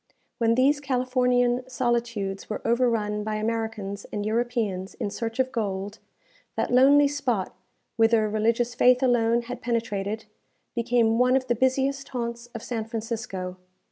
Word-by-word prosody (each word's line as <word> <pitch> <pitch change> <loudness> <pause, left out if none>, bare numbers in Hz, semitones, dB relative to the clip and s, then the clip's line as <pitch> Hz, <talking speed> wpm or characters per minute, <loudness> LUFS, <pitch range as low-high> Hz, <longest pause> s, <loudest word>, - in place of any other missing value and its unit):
When 230 -1 +3
these 275 +4 +3
Californian 250 -2 +1
solitudes 235 -6 -2
were 215 - -3
overrun 230 -3 +1
by 215 0 -2
Americans 220 -2 -3
and 205 -1 -3
Europeans 220 -4 -1
in 200 - -3
search 225 0 -4
of 260 0 +1
gold, 205 -2 -3 0.6
that - - -1
lonely 280 +3 +6
spot, 260 -9 -1 0.4
whither 225 -1 +4
religious 230 +3 +1
faith 250 +1 +4
alone 235 -2 +3
had 245 +1 -7
penetrated, 220 -3 -2 0.5
became 235 -1 +2
one 250 +1 +4
of 265 -1 +1
the 240 - +1
busiest 265 +3 0
haunts 235 -2 -4
of 230 - -6
San 225 -3 -3
Francisco. 220 -5 -5
235 Hz, 140 wpm, -26 LUFS, 215-250 Hz, 0.6 s, lonely